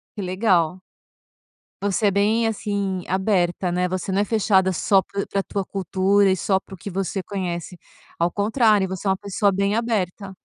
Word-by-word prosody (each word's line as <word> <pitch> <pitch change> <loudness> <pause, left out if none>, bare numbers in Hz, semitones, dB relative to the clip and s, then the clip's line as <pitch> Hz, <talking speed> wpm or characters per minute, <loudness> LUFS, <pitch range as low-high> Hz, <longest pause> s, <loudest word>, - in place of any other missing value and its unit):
Que 205 - -5
legal. 185 -2 +1 1.0
Você 205 +1 +1
é - - +3
bem, 210 +4 +2
assim, 200 -4 -2
aberta, 185 -2 0
né. 180 +1 0
Você 185 +1 -3
não 195 - +2
é - - +2
fechada 195 -3 +2
só 190 +2 +3
pra 200 +1 -4
pra 195 - -1
tua 195 0 -3
cultura 195 +1 +2
e 190 - +2
só 190 +1 +1
para 195 - -13
o - - -9
que 200 - -8
você 195 +1 -2
conhece. 180 -2 -5 0.4
Ao 170 +1 +2
contrário, 210 0 +2
você 190 +1 -6
é 195 - +3
uma 190 - +2
pessoa 200 +1 0
bem 200 +2 0
aberta. 200 -4 -2
195 Hz, 185 wpm, -22 LUFS, 185-205 Hz, 1.0 s, é